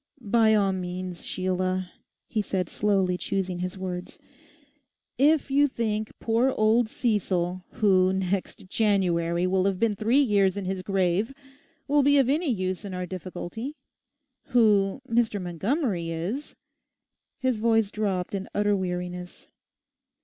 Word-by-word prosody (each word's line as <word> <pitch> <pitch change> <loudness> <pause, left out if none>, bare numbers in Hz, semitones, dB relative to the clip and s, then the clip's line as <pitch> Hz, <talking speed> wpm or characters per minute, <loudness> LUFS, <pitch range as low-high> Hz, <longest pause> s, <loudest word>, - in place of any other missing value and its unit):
'By 220 -1 +3
all 200 -2 +3
means, 180 -1 -5
Sheila,' 185 0 -2 0.4
he 215 - -1
said 185 -4 -2
slowly 190 -3 +1
choosing 185 -2 -2
his 180 +1 -4
words, 180 -1 -5 1.0
'if 290 0 +3
you 285 +1 +4
think 220 -4 -2
poor 230 +3 +2
old 220 +1 +3
Cecil, 185 -6 -1
who 185 -3 +3
next 190 0 -2
January 180 -5 +1
will 185 0 +1
have 195 -2 0
been 225 -3 +2
three 225 +6 +2
years 205 -8 +3
in 200 - -3
his 190 0 -2
grave, 195 +5 0 0.5
will 290 +1 +4
be 285 +1 +4
of 265 -2 +3
any 310 +3 +1
use 185 -4 -2
in 195 -2 -6
our 180 0 -3
difficulty. 185 - -6 0.7
Who 215 -2 +3
Mr. 230 -3 +1
Montgomery 185 - -1
is...' 180 - -4 0.8
His 260 -4 0
voice 225 -2 +2
dropped 195 -4 -2
in 195 -1 -4
utter 205 0 +2
weariness. 180 -1 -5
195 Hz, 135 wpm, -26 LUFS, 185-225 Hz, 1.0 s, you